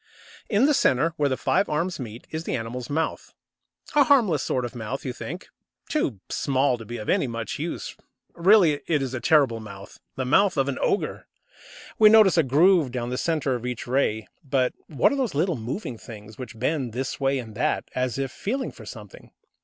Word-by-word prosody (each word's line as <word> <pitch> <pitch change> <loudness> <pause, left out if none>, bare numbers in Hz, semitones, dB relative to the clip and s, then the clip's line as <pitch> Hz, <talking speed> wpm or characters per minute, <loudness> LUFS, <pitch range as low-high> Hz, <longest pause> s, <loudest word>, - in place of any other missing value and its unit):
In 215 +3 +3
the 300 - +4
centre, 160 - +2
where 145 -1 +2
the 130 - -1
five 135 +9 +1
arms 165 +4 -1
meet, 115 -2 -8
is 160 +1 -4
the - - -1
animal's 120 +1 -5
mouth. 160 +3 -3 0.6
A 290 -2 +5
harmless 220 - +4
sort 125 -1 -1
of 120 - -6
mouth, 120 +4 -5
you 130 - -3
think, 175 +8 -7 0.4
too 140 - -1
small 130 -2 +1
to 115 - -9
be 120 +3 -6
of 105 - -7 0.2
much 115 -2 -4
use. - - -4 0.4
Really, 175 -4 +4
it 150 -4 +1
is 130 -1 -4
a 130 - -2
terrible 135 -6 +3
mouth, 100 -3 -11 0.2
the 130 - -2
mouth 190 +7 +3
of 135 0 +2
an 140 - -2
ogre! 205 - -1 0.7
We 215 -1 +8
notice 215 -3 +6
a 165 - +5
groove 155 +1 +4
down 120 -1 -3
the - - -1
centre 155 -5 0
of 120 -2 -4
each 125 -1 -4
ray. 120 -4 0 0.2
But 130 -3 +1
what 150 - +2
are - - 0
those 255 - -1
little 170 +3 +1
moving 120 - -5
things 110 -1 -11
which 125 0 -9
bend 130 -1 -1
this 130 +3 -3
way 135 0 +1
and 115 -4 -7
that, 110 - 0
as 125 -1 -1
if 135 -2 -2
feeling 260 +6 -3
for - - -13
something? - - -11
135 Hz, 200 wpm, -25 LUFS, 120-170 Hz, 0.7 s, We